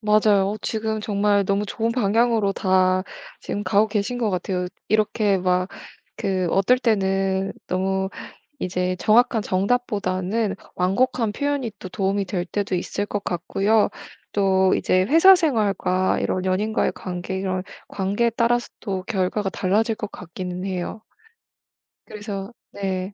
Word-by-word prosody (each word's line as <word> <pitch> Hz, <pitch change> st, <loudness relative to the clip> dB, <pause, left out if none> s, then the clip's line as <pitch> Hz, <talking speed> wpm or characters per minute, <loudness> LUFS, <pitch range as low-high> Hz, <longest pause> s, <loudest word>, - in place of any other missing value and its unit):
맞아요. 210 Hz, -2 st, +3 dB
지금 220 Hz, -1 st, -2 dB
정말 205 Hz, -1 st, +1 dB
너무 200 Hz, +2 st, 0 dB
좋은 225 Hz, +3 st, -1 dB
방향으로 225 Hz, -2 st, +2 dB
다 185 Hz, -1 st, +2 dB, 0.4 s
지금 205 Hz, -, -4 dB
가고 215 Hz, +1 st, +3 dB
계신 210 Hz, +3 st, -1 dB
것 225 Hz, -3 st, 0 dB
같아요. 180 Hz, 0 st, -2 dB, 0.2 s
이렇게 215 Hz, -2 st, +2 dB
막 180 Hz, 0 st, +1 dB, 0.5 s
그 185 Hz, -3 st, 0 dB
어떨 195 Hz, +7 st, +3 dB
때는 195 Hz, -4 st, +1 dB, 0.2 s
너무 190 Hz, +1 st, 0 dB, 0.5 s
이제 180 Hz, 0 st, -1 dB
정확한 225 Hz, +2 st, +4 dB
정답보다는 200 Hz, -1 st, 0 dB, 0.2 s
완곡한 220 Hz, +5 st, +1 dB
표현이 285 Hz, +1 st, -1 dB
또 185 Hz, -, -7 dB
도움이 195 Hz, +1 st, -1 dB
될 180 Hz, -1 st, -2 dB
때도 200 Hz, +1 st, -2 dB
있을 200 Hz, +3 st, -2 dB
것 205 Hz, -1 st, -3 dB
같고요. 195 Hz, +5 st, +1 dB, 0.4 s
또 190 Hz, -2 st, +3 dB
이제 185 Hz, -, +2 dB
회사 330 Hz, -, +7 dB
생활과 200 Hz, -, +1 dB
이런 185 Hz, 0 st, -1 dB
연인과의 205 Hz, +4 st, +1 dB
관계 185 Hz, +1 st, -4 dB
이런 185 Hz, -1 st, -2 dB, 0.2 s
관계에 205 Hz, +4 st, 0 dB
따라서 235 Hz, +1 st, +1 dB
또 190 Hz, -3 st, -3 dB
결과가 195 Hz, -1 st, -1 dB
달라질 215 Hz, +5 st, +1 dB
것 210 Hz, -1 st, -6 dB
같기는 180 Hz, +1 st, -6 dB
해요. 185 Hz, +3 st, -4 dB, 1.1 s
그래서 205 Hz, -1 st, -6 dB, 0.2 s
네. 190 Hz, -1 st, -3 dB
200 Hz, 280 characters per minute, -23 LUFS, 185-220 Hz, 1.1 s, 회사